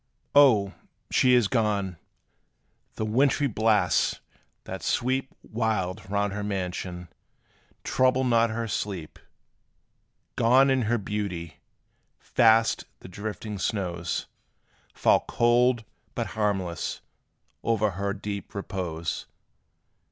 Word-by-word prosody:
O! 110 Hz, -9 st, +5 dB, 0.4 s
she 125 Hz, -1 st, +5 dB
is 120 Hz, -4 st, +4 dB
gone! 100 Hz, -6 st, 0 dB, 1.0 s
the 110 Hz, -, -2 dB
wintry 135 Hz, +6 st, +2 dB
blasts, 110 Hz, -4 st, +2 dB, 0.4 s
that -, -, -7 dB
sweep 130 Hz, +2 st, 0 dB
Wild 105 Hz, -4 st, -2 dB
round 100 Hz, 0 st, 0 dB
her 105 Hz, 0 st, -4 dB
mansion, 90 Hz, -3 st, -4 dB, 0.8 s
trouble 130 Hz, 0 st, +2 dB
not 115 Hz, -2 st, +3 dB
her 115 Hz, +1 st, -3 dB
sleep: 95 Hz, -6 st, -4 dB, 1.2 s
Gone 130 Hz, +4 st, +5 dB
in 130 Hz, -1 st, +2 dB
her 120 Hz, -, +3 dB
beauty! 95 Hz, -7 st, -4 dB, 0.6 s
Fast 115 Hz, -1 st, +3 dB, 0.2 s
the -, -, -10 dB
drifting 105 Hz, +2 st, -6 dB
snows 90 Hz, -4 st, -2 dB, 0.7 s
Fall -, -, +3 dB
cold, 120 Hz, 0 st, +3 dB, 0.3 s
but -, -, -1 dB
harmless, 95 Hz, -6 st, -2 dB, 0.6 s
o'er 110 Hz, -2 st, +1 dB
her 100 Hz, +2 st, -2 dB
deep 100 Hz, 0 st, -6 dB
repose! 90 Hz, -5 st, -4 dB
105 Hz, 100 wpm, -26 LUFS, 95-115 Hz, 1.2 s, O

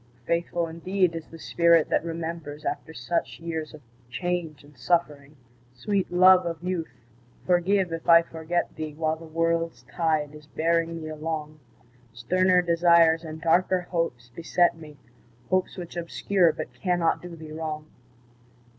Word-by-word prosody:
Faithful 170 Hz, 0 st, 0 dB
indeed 180 Hz, +2 st, 0 dB
is 165 Hz, -1 st, -6 dB
the 165 Hz, -, -12 dB
spirit 170 Hz, 0 st, +3 dB
that -, -, +1 dB
remembers 165 Hz, -3 st, -6 dB
After -, -, -3 dB
such 150 Hz, +3 st, -3 dB
years 160 Hz, -2 st, -4 dB
of 150 Hz, -2 st, -13 dB, 0.3 s
change 160 Hz, +3 st, -3 dB
and 145 Hz, 0 st, -18 dB
suffering! 150 Hz, 0 st, -1 dB, 0.4 s
Sweet 195 Hz, +9 st, -1 dB
love 185 Hz, +1 st, +7 dB
of 170 Hz, 0 st, -5 dB
youth, 170 Hz, -9 st, -4 dB, 0.4 s
forgive 180 Hz, 0 st, +2 dB
if 165 Hz, +1 st, -5 dB
I 170 Hz, 0 st, +8 dB
forget 165 Hz, +1 st, -3 dB
thee 155 Hz, -1 st, -6 dB
While 160 Hz, 0 st, -1 dB
the 165 Hz, -, -11 dB
world's 165 Hz, +1 st, -1 dB
tide 155 Hz, -3 st, -1 dB
is 150 Hz, -1 st, -13 dB
bearing 165 Hz, +1 st, 0 dB
me 155 Hz, -, -6 dB
along; 155 Hz, -1 st, -5 dB, 0.5 s
Sterner 180 Hz, +9 st, +2 dB
desires 170 Hz, -1 st, +4 dB
and 160 Hz, -1 st, -7 dB
darker 180 Hz, +3 st, +2 dB
hopes 165 Hz, -9 st, -3 dB
beset 170 Hz, +3 st, +2 dB
me, 155 Hz, -3 st, -13 dB, 0.5 s
Hopes 185 Hz, +1 st, 0 dB
which 175 Hz, -2 st, -8 dB
obscure 175 Hz, +1 st, +1 dB
but -, -, -7 dB
cannot 175 Hz, -3 st, 0 dB
do 175 Hz, -1 st, -9 dB
thee 160 Hz, -1 st, -10 dB
wrong. 155 Hz, -1 st, -5 dB
165 Hz, 145 wpm, -26 LUFS, 155-175 Hz, 0.5 s, I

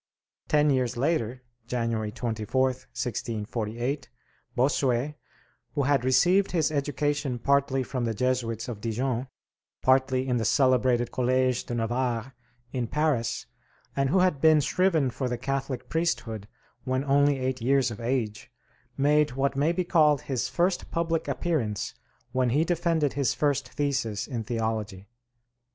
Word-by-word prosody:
Ten 150 Hz, -1 st, +3 dB
years 130 Hz, -3 st, 0 dB
later 130 Hz, -3 st, 0 dB, 0.2 s
(January 115 Hz, -3 st, -1 dB
24th, 125 Hz, +4 st, -1 dB
1648) 120 Hz, +4 st, -3 dB, 0.5 s
Bossuet, 130 Hz, +1 st, +1 dB, 0.6 s
who 145 Hz, -, +1 dB
had 140 Hz, -2 st, +2 dB
received 180 Hz, +11 st, +3 dB
his 160 Hz, -3 st, +2 dB
education 145 Hz, -2 st, -1 dB
partly 135 Hz, +1 st, +2 dB
from 125 Hz, -1 st, -3 dB
the 115 Hz, -1 st, -1 dB
Jesuits 120 Hz, -1 st, -1 dB
of 115 Hz, -4 st, -6 dB
Dijon, 120 Hz, +3 st, -1 dB, 0.6 s
partly 130 Hz, 0 st, +3 dB
in 125 Hz, -1 st, +1 dB
the 115 Hz, -, 0 dB
celebrated 125 Hz, 0 st, +3 dB
Collège 130 Hz, 0 st, +1 dB
de 120 Hz, -, -3 dB
Navarre 120 Hz, +1 st, -1 dB, 0.4 s
in 125 Hz, -3 st, -1 dB
Paris, 135 Hz, -5 st, 0 dB, 0.5 s
and 135 Hz, -1 st, +1 dB
who 185 Hz, +5 st, +3 dB
had 180 Hz, -7 st, +2 dB
been 155 Hz, -1 st, +6 dB
shriven 155 Hz, -1 st, +2 dB
for 130 Hz, +2 st, -3 dB
the 120 Hz, -, -2 dB
Catholic 135 Hz, 0 st, -3 dB
priesthood 120 Hz, -11 st, -2 dB, 0.4 s
when 130 Hz, +1 st, 0 dB
only 140 Hz, 0 st, +3 dB
eight 130 Hz, -1 st, -2 dB
years 130 Hz, 0 st, +2 dB
of 110 Hz, -, -7 dB
age, 115 Hz, -3 st, -2 dB, 0.5 s
made 150 Hz, 0 st, +3 dB
what 135 Hz, +1 st, 0 dB
may 145 Hz, +4 st, +2 dB
be 180 Hz, +1 st, 0 dB
called 155 Hz, -5 st, +4 dB
his 130 Hz, -4 st, -2 dB
first 175 Hz, +1 st, 0 dB
public 165 Hz, -1 st, -1 dB
appearance 125 Hz, -, -1 dB, 0.4 s
when 130 Hz, -1 st, +1 dB
he 145 Hz, +7 st, +3 dB
defended 165 Hz, -4 st, +1 dB
his 140 Hz, -2 st, 0 dB
first 145 Hz, -3 st, 0 dB
thesis 130 Hz, -8 st, -1 dB
in 120 Hz, -4 st, -4 dB
theology. 110 Hz, -3 st, -3 dB
130 Hz, 140 wpm, -27 LUFS, 120-145 Hz, 0.6 s, been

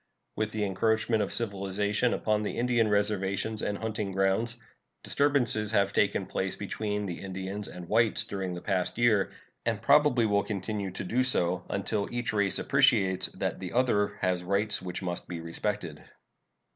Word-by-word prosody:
With 110 Hz, -1 st, -1 dB
the 110 Hz, -1 st, -2 dB
encroachment 110 Hz, +3 st, +1 dB
of 100 Hz, -, -2 dB
civilization 100 Hz, +1 st, 0 dB
upon 105 Hz, -1 st, 0 dB
the 105 Hz, -, -3 dB
Indian 120 Hz, -2 st, +2 dB
reservations 105 Hz, +1 st, 0 dB
and 100 Hz, -, -2 dB
hunting 110 Hz, -2 st, -3 dB
grounds, 95 Hz, +5 st, +1 dB, 0.5 s
disturbances 125 Hz, -7 st, +2 dB
have 100 Hz, -1 st, +2 dB
taken -, -, +1 dB
place -, -, -3 dB
between 105 Hz, -1 st, -3 dB
the 90 Hz, -3 st, -5 dB
Indians 95 Hz, +2 st, -5 dB
and 90 Hz, -1 st, -9 dB
whites 110 Hz, +3 st, +3 dB
during 95 Hz, -2 st, -4 dB
the 90 Hz, -, -7 dB
past 95 Hz, -1 st, -1 dB
year, 110 Hz, -5 st, +3 dB, 0.3 s
and -, -, -1 dB
probably 145 Hz, -5 st, +4 dB
will 100 Hz, -1 st, +2 dB
continue 100 Hz, -1 st, -3 dB
to 90 Hz, -, -6 dB
do 120 Hz, +7 st, +1 dB
so 90 Hz, -8 st, +2 dB
until 100 Hz, +1 st, -2 dB
each 120 Hz, -3 st, -2 dB
race 100 Hz, -2 st, +2 dB
appreciates 115 Hz, -9 st, +3 dB
that -, -, -3 dB
the 90 Hz, -2 st, -6 dB
other 120 Hz, -5 st, +1 dB
has 90 Hz, -1 st, 0 dB
rights 100 Hz, +3 st, +1 dB
which 90 Hz, +1 st, -5 dB
must 90 Hz, -1 st, -4 dB
be 85 Hz, -2 st, -5 dB
respected. 85 Hz, 0 st, -4 dB
105 Hz, 160 wpm, -28 LUFS, 95-110 Hz, 0.5 s, probably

